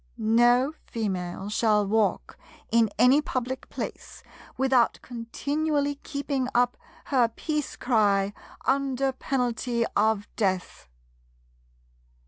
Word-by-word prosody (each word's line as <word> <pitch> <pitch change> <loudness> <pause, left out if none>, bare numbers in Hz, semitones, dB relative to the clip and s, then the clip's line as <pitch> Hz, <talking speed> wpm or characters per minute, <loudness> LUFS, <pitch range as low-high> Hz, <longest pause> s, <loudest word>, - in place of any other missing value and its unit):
No 240 +5 +3
Female 190 -4 -3
shall 210 -1 +2
walk 210 0 0 0.4
in 230 -1 +4
any 250 +6 +5
public 260 -2 -4
place - - -7 0.3
without 265 -3 +3
continually 285 +5 -1
keeping 280 -3 -2
up 245 0 +3 0.4
her 245 -3 +5
Peace 300 +5 -3
cry, 205 -5 +2 0.3
under 270 0 +1
penalty 245 -3 -1
of 215 0 +2
death. 190 - -2
240 Hz, 95 wpm, -26 LUFS, 215-265 Hz, 0.4 s, any